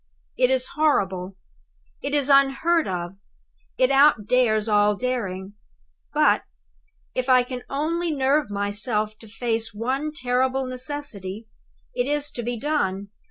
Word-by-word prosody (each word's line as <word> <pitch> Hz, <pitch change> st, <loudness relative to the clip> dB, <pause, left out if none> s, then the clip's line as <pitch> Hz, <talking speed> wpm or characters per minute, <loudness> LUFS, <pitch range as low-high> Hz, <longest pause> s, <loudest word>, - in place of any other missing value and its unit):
It 250 Hz, -1 st, +3 dB
is 260 Hz, -1 st, 0 dB
horrible, 190 Hz, -11 st, 0 dB, 0.6 s
it 285 Hz, +1 st, -2 dB
is 285 Hz, -2 st, +1 dB
unheard 275 Hz, +4 st, +4 dB
of, 180 Hz, 0 st, -4 dB, 0.6 s
it 255 Hz, +1 st, +3 dB
outdares 250 Hz, -5 st, +4 dB
all 210 Hz, -1 st, +3 dB
daring; 200 Hz, -6 st, -3 dB, 0.6 s
but, -, -, +3 dB, 0.7 s
if 255 Hz, +1 st, -2 dB
I 255 Hz, -1 st, +6 dB
can 250 Hz, 0 st, -6 dB
only 330 Hz, +5 st, -1 dB
nerve 280 Hz, -1 st, +1 dB
myself 210 Hz, +2 st, -1 dB
to 225 Hz, -, -13 dB
face 225 Hz, 0 st, -3 dB
one 265 Hz, +7 st, -2 dB
terrible 260 Hz, -1 st, 0 dB
necessity, 250 Hz, -6 st, -6 dB, 0.4 s
it -, -, -1 dB
is 295 Hz, 0 st, 0 dB
to 240 Hz, -, -5 dB
be 240 Hz, +1 st, -3 dB
done. 200 Hz, -9 st, -1 dB
250 Hz, 125 wpm, -24 LUFS, 210-280 Hz, 0.7 s, I